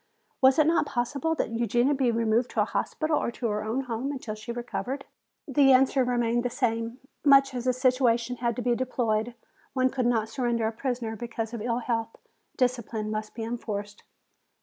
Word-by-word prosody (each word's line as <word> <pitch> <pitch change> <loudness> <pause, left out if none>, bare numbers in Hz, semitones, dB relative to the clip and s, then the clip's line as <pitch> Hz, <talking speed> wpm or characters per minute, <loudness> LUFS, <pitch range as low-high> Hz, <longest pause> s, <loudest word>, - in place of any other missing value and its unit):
Was 265 0 +6
it 310 - +5
not 325 -1 +2
possible 280 +6 -1
that 240 - -2
Eugenia 240 +4 +2
be 265 -3 +1
removed 230 +1 +1
to - - 0
a - - +3
hospital 310 -1 -1
or - - -1
to 240 - -5
her 210 0 -1
own 225 +5 -1
home 255 +2 -3
until 255 -6 -5
she 215 +3 -7
recovered? 245 +3 -4 0.4
The 270 -1 +5
answer 265 +1 +4
remained 240 -1 +1
the 245 - -1
same. 230 -1 -1 0.3
Much 275 -2 +6
as 245 -1 -4
the 255 - +3
situation 250 -2 +2
was 235 -2 0
to 245 - -4
be 245 - +2
deplored, 235 -2 -1 0.4
one 255 -1 +2
could 255 -2 0
not 225 -3 +1
surrender 235 -1 -1
a 220 - 0
prisoner 235 -1 -3
because 230 0 -5
of 235 - -4
ill 235 +1 0
health. 230 -2 -1 0.4
Discipline 235 -4 -1
must 215 0 -4
be 225 - -4
enforced. 210 -3 -5
240 Hz, 190 wpm, -27 LUFS, 230-260 Hz, 0.4 s, Was